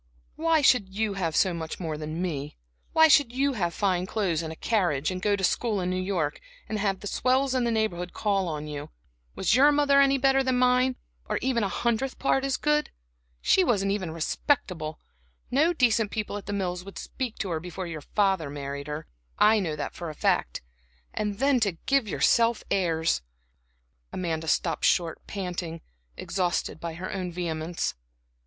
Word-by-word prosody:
"Why 325 -1 +2
should 235 -8 +4
you 210 +1 -1
have 170 -5 -2
so 185 -3 +3
much 160 -1 -5
more 160 -4 -3
than 155 +3 -4
me? 150 -5 -4 0.3
Why 320 0 +7
should 285 -5 +5
you 275 +2 +1
have 175 -8 -1
fine 185 -1 0
clothes, 185 -8 0
and 160 -1 -5
a - - -7
carriage, 175 -8 0
and 185 0 -4
go 205 +1 +2
to 195 - -5
school 215 +2 +1
in 180 0 -1
New 185 0 -1
York, 180 -6 -2 0.3
and 215 - -3
have 195 -2 0
the - - -8
swells 260 +5 +1
in 255 -2 +1
the - - +1
neighborhood 180 -6 -1
call 200 -3 0
on 150 -2 -4
you? 150 -1 -6 0.5
Was 190 - +1
your 275 +5 +6
mother 285 -1 +4
any 275 0 +4
better 270 0 +3
than 260 -1 +1
mine, 250 +1 +3 0.3
or - - 0
a 235 -6 +1
hundredth 235 +6 -1
part 270 0 +1
as 275 -1 0
good? 300 0 +1 0.5
She 380 - +4
wasn't 200 - +1
even 195 -4 -2
respectable; 160 - -1 0.5
no 305 +6 +4
decent 235 -8 +2
people 210 -1 -3
at 205 - -7
The - - -3
Mills 180 -3 -2
would 195 +1 -10
speak 250 -4 -5
to 190 - -3
her 160 - -1
before 180 +2 -6
your 160 -3 -6
father 190 -3 +1
married 140 0 -5
her 150 +1 -5 0.3
I 215 +1 +5
know 165 -6 -2
that 150 - -4
for 170 -2 -6
a 155 - -8
fact. - - 0 0.5
And 210 -1 -2
then 270 +1 +3
to 205 -5 +1
give 275 -4 +2
yourself 230 +2 +2
airs!" 160 - +1 0.9
Amanda 160 -3 -3
stopped - - +1
short, 170 -3 +1
panting, 175 -4 -4 0.4
exhausted 180 -3 -1
by 165 -1 -5
her 180 +3 -5
own 185 -2 -3
vehemence. 170 -1 -2
195 Hz, 185 wpm, -27 LUFS, 165-245 Hz, 0.9 s, Why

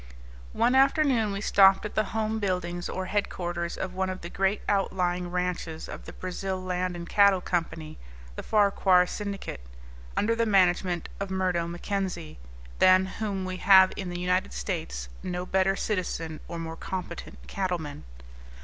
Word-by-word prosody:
One 235 +3 +2
afternoon 265 -5 +3
we 200 0 -3
stopped 195 -1 +5
at 210 - -5
the 215 - +1
home 220 +1 -2
buildings 180 -3 -2
or 185 - -3
headquarters 175 -4 -2
of 185 -1 -4
one 190 0 -1
of 185 0 -5
the 170 - -7
great 195 +2 0
outlying 180 -3 0
ranches 180 -3 -3
of - - -8
the - - -9
Brazil 185 +1 -4
Land 185 -1 -2
and 170 0 -7
Cattle 200 -1 +5
Company, 165 -3 -3 0.4
the - - -5
Farquahar 195 -3 +4
syndicate, 200 - -5 0.6
under 230 +2 +2
the 230 0 +1
management 180 -3 +2
of 200 -1 -3
Murdo 185 -3 0
Mackenzie 175 - -4 0.4
than 185 0 +6
whom 195 -1 -3
we 185 0 -4
have 190 0 +7
in 190 -3 -4
the 175 0 -4
United 180 - 0
States - - -4
no 180 0 -3
better 190 +1 +2
citizen 170 -6 -3
or 170 - -6
more 165 -1 -5
competent 180 -1 -6
cattleman. 175 - -3
185 Hz, 155 wpm, -27 LUFS, 175-200 Hz, 0.6 s, have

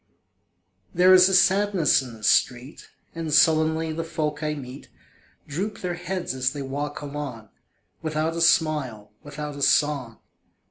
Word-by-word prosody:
There 185 +1 +6
is 185 0 +7
a - - -1
sadness 190 -5 +3
in 125 -3 -10
the 110 - -16
street, 125 +5 0 0.2
And 165 -2 -5
sullenly 160 +2 +2
the 165 +1 -4
folk 155 -2 -4
I 150 0 -2
meet 135 -1 -10 0.6
Droop 195 +9 -5
their 180 -1 -3
heads 180 +1 -4
as 130 0 -1
they 145 -2 -5
walk 145 +3 -5
along, 140 -7 -7 0.5
Without 155 +1 -2
a 170 - -3
smile, 145 -11 +1
without 150 0 -7
a 140 - -8
song. 140 -5 +1
150 Hz, 145 wpm, -24 LUFS, 135-165 Hz, 0.6 s, is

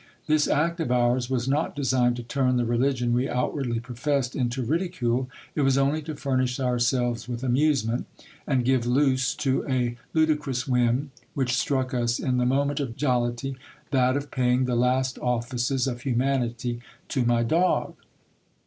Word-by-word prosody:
This 155 -1 +2
act 170 +3 +1
of 160 -7 -1
ours 120 0 +2
was 130 -1 -1
not 145 +4 0
designed 130 -3 +2
to 120 - -6
turn 125 +1 +1
the 120 - +1
religion 120 0 +1
we 125 +3 +1
outwardly 125 -1 -1
professed 125 +2 -2
into 125 0 -1
ridicule; 130 -4 -1 0.2
it 150 - -1
was 135 -1 +3
only 140 +3 +2
to 155 0 -6
furnish 130 -2 -1
ourselves 120 -1 0
with 120 0 -4
amusement, 130 -3 +1 0.4
and 130 -4 +1
give 130 -2 +2
loose 130 0 +2
to 135 -2 0
a 120 -2 0 0.2
ludicrous 150 -5 +1
whim 125 +2 +1 0.2
which 130 -3 0
struck 130 0 0
us 120 -1 +1
in 125 -1 -1
the 125 0 +2
moment 140 +2 +1
of 130 -5 -3
jollity, 125 -1 -1 0.4
that 130 -1 +3
of 145 0 -6
paying 125 0 +2
the 125 -1 0
last 125 +2 +1
offices 125 +1 -1
of 120 -3 -3
humanity 120 -2 -1 0.3
to 130 - 0
my 120 -1 +2
dog. 165 +10 +1
125 Hz, 160 wpm, -25 LUFS, 120-135 Hz, 0.4 s, was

